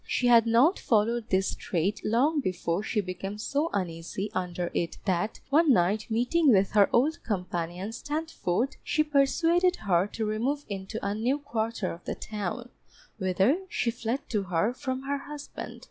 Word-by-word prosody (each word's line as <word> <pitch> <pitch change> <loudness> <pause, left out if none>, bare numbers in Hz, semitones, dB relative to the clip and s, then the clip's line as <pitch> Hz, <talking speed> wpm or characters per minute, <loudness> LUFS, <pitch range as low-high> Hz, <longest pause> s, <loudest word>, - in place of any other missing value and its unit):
She 250 - 0
had 235 -2 +6
not 250 +11 +4
followed 230 +1 +1
this 190 0 +1
trade 185 +4 -2
long 275 +8 +2
before 185 -5 -1
she 215 0 -1
became 195 +2 -5
so 285 +8 -1
uneasy 180 +2 -3
under 180 -2 -2
it 170 - -2
that 190 +2 0
one 310 +1 +5
night 210 +1 +2
meeting 250 +7 +3
with 195 -2 +3
her 205 -2 +5
old 295 +7 +2
companion 180 -2 -3
Standford, 275 - -2
she 305 - +2
persuaded 330 +5 +3
her 190 - +1
to 220 +1 -3
remove 250 +8 -1
into 200 +1 -5
a 200 - 0
new 240 +6 0
quarter 230 -7 -2
of 170 - -10
the - - -3
town, 215 +3 -5 0.5
whither 190 - +2
she 235 - 0
fled 235 +3 -2
to 210 -3 0
her 185 +4 0
from 260 0 -4
her 280 +1 -2
husband. 295 +1 -8
220 Hz, 160 wpm, -28 LUFS, 190-275 Hz, 0.5 s, had